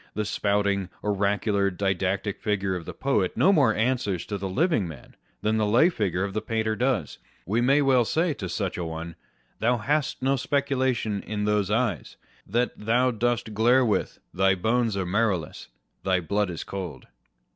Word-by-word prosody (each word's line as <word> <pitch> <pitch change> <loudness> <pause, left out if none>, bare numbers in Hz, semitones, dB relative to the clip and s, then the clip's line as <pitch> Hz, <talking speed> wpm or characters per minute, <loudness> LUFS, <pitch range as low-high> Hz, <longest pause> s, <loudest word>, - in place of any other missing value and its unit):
The 105 - -1
spouting, 100 -2 0
oracular, 100 0 +1
didactic 95 +1 -1
figure 100 -3 0
of 85 -3 -6
the - - -6
poet 130 -9 0
no 195 - +5
more 130 - +4
answers 110 -6 0
to 100 -2 -4
the 95 0 -3
living 140 - +1
man, 75 -6 -11 0.3
than 110 +1 +1
the 110 - +2
lay 120 +11 +5
figure 100 - -1
of 100 -1 -3
the 110 - -1
painter 110 0 -1
does. 120 - -1 0.3
We 110 +6 0
may 140 +4 +4
well 130 -3 +4
say 160 +7 0
to 95 -9 -6
such 95 0 -3
a - - -2
one 80 0 -5
â€" - - -17 0.4
Thou 120 +2 +2
hast 145 +4 -1
no 135 +1 +2
speculation 130 -6 0
in 105 -1 -3
those 105 -2 +1
eyes 115 +2 -1 0.3
That 120 +5 0
thou 120 +4 +2
dost 120 -1 -1
glare 120 +4 +4
with: 110 - -1 0.2
thy 95 +1 +3
bones 110 +2 0
are 95 - -1
marrowless, 95 -4 -1 0.4
Thy 95 -1 +2
blood 100 +3 -1
is 85 - -5
cold 95 -5 -6
105 Hz, 180 wpm, -26 LUFS, 95-120 Hz, 0.4 s, no